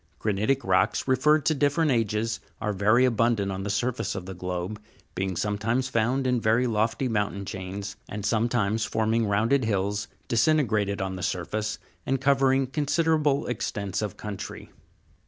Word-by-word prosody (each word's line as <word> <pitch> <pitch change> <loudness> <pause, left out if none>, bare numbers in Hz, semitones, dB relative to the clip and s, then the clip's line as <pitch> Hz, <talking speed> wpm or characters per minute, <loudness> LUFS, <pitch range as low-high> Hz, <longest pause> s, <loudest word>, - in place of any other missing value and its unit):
Granitic 110 +6 0
rocks, - - +2
referred 145 +4 +3
to 155 - +4
different 145 +2 +2
ages, 115 -1 0 0.2
are 105 -1 -1
very 110 +6 +4
abundant 115 -4 +1
on 95 0 -4
the 100 - -3
sur 105 +5 +1
face 125 - -4
of 95 - -5
the 95 - -6
globe; 90 +3 -4 0.3
being 95 0 -2
found 105 +3 -1
sometimes 125 +4 0
in 125 +2 +1
very 115 +4 +3
lofty 115 +3 0
mountain 105 -3 -1
chains, 95 +2 -6
and 105 0 -5
sometimes 110 -1 +1
forming 110 +1 +1
rounded 115 +7 +2
hills 100 -1 -1 0.2
disintegrated 110 -6 +2
on 95 -1 -4
the - - -6
surface, 100 +5 -2 0.3
and 135 0 0
cover 135 0 +3
ing 135 0 +2
considerable 150 +1 +1
extents 100 -5 -3
of 105 -3 -4
country. 105 -2 -7
110 Hz, 155 wpm, -26 LUFS, 100-130 Hz, 0.3 s, to